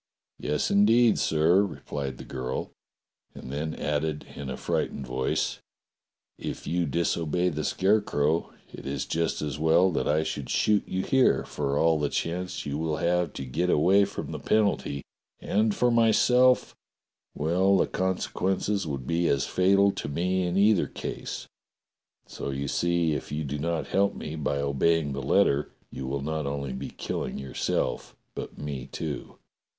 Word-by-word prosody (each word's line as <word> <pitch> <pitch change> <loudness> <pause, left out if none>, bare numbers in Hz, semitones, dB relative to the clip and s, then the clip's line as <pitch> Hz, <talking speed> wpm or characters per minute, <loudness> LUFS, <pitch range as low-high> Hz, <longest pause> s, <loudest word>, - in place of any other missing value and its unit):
*'Yes, 75 0 -1
indeed, 110 +3 +5
sir," 80 +5 +4
repHed 70 -8 -4
the - - -8
girl, 65 -1 -4 0.6
and 65 - -8
then 80 +3 -3
added 75 +1 -2
in 70 -2 -6
a - - -4
frightened 70 - -2
voice: 65 +1 -1 0.8
"If - - -5
you 85 -1 0
disobey 85 +3 0
the 75 -2 -3
Scarecrow, 85 -5 +1 0.2
it - - -8
is 70 - -2
just 80 -1 -1
as 75 0 -3
well 85 +4 +4
that - - -1
I 75 +1 +2
should 70 -4 -4
shoot 105 -1 +2
you 95 0 -2
here, 135 -2 +3
for 70 -1 -2
all 80 0 +3
the 75 -1 0
chance 90 +2 -3
you 70 +1 -3
will 80 -1 -1
have 85 -2 +1
to 70 - -5
get 80 +8 -1
away 95 +6 +5
from 100 - -6
the - - -5
penalty, 100 -10 +1 0.4
and 105 +1 +1
for 125 0 +3
myself 125 +2 +4 0.3
— - - -56
well, 90 +6 +3
the - - +3
consequences 95 +1 -1
would 70 -4 -4
be 85 +3 +1
as 70 - +2
fatal 100 +2 +4
to 75 - -5
me 90 +4 0
in 90 +2 -1
either 100 -1 +4
case, - - -6 0.8
so - - -6
you 70 +1 -3
see 85 +1 +1
if 70 - -5
you 75 +1 -2
do 70 0 -4
not 85 +2 -1
help 100 +1 +1
me 75 - -6
by 75 -2 -1
obeying 70 +2 +1
the 70 - -3
letter 70 +2 +2 0.2
you 65 - -6
will 70 +1 -2
not 80 -1 -2
only 70 -2 -3
be 65 +2 -5
killing - - -4
yourself 70 -1 -2 0.2
but - - -7
me, 70 -3 -5
too." - - -6
80 Hz, 165 wpm, -27 LUFS, 70-95 Hz, 0.8 s, indeed